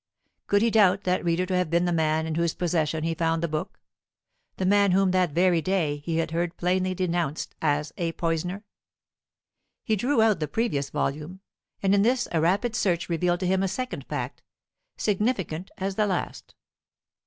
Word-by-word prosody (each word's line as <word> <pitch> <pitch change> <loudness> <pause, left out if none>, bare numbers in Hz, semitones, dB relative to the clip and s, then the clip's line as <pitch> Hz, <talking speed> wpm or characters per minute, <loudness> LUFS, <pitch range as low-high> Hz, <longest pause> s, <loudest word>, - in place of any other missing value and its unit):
Could 205 +1 +3
he 230 - +3
doubt 200 -3 +4
that 180 0 0
reader 175 +1 +1
to 185 0 -2
have 180 -2 +1
been 170 +2 +2
the 175 - 0
man 160 -1 +1
in 160 - -3
whose 170 0 0
possession 160 -3 0
he 165 0 0
found 165 0 0
the - - +1
book, 155 +5 -4 0.8
the 190 - -1
man 200 0 +4
whom 190 0 +3
that 185 -2 +2
very 175 +2 +2
day 165 -5 0
he 160 +3 -3
had 165 -1 -1
heard 170 +1 -2
plainly 185 +1 0
denounced 170 -4 -2
as 150 -1 0
a 170 -1 -1
poisoner? 175 +5 -2 1.2
He 220 - +1
drew 250 +6 +1
out 215 -6 +3
the 155 - -1
previous 145 - -1
volume, 155 +9 -3 0.4
and 195 0 +3
in 200 - +4
this 245 +4 +2
a 165 - +1
rapid 200 +8 +1
search 180 -7 0
revealed 175 +1 0
to - - 0
him 190 +1 +2
a 195 - +1
second 250 +7 -4
fact, - - -4 0.6
significant 195 -5 -1
as 195 +1 -2
the 210 +1 +1
last. 185 -3 -4
180 Hz, 185 wpm, -26 LUFS, 165-195 Hz, 1.2 s, doubt